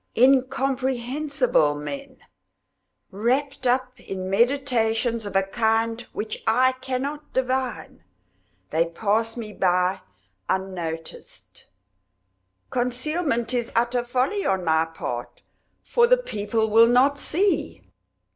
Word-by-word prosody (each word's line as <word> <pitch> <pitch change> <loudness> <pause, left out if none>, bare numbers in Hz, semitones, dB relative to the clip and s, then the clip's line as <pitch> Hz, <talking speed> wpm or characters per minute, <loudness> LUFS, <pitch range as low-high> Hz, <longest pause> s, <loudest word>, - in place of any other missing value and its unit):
Incomprehensible 260 - +2
men! 270 - -7 0.9
Wrapped 255 +6 -1
up 255 0 0
in 190 -3 -5
meditations 235 -1 +1
of 200 - -8
a 195 - +4
kind 225 +3 0
which 215 +1 -5
I 255 +4 +4
cannot 265 +3 -5
divine, 255 - -2 0.7
they 165 +2 +2
pass 220 +6 -1
me 215 -3 -6
by 180 0 +1 0.5
unnoticed. 175 -4 -5 1.0
Concealment 250 0 -1
is 240 -2 -1
utter 240 +1 +1
folly 260 +12 0
on 190 -2 0
my 160 0 +3
part, 125 -7 -6 0.4
for 475 -1 +3
the - - +5
people 220 - -2
will 225 +2 +7
not 265 +4 +3
see. 380 +7 0
240 Hz, 100 wpm, -24 LUFS, 205-265 Hz, 1.0 s, will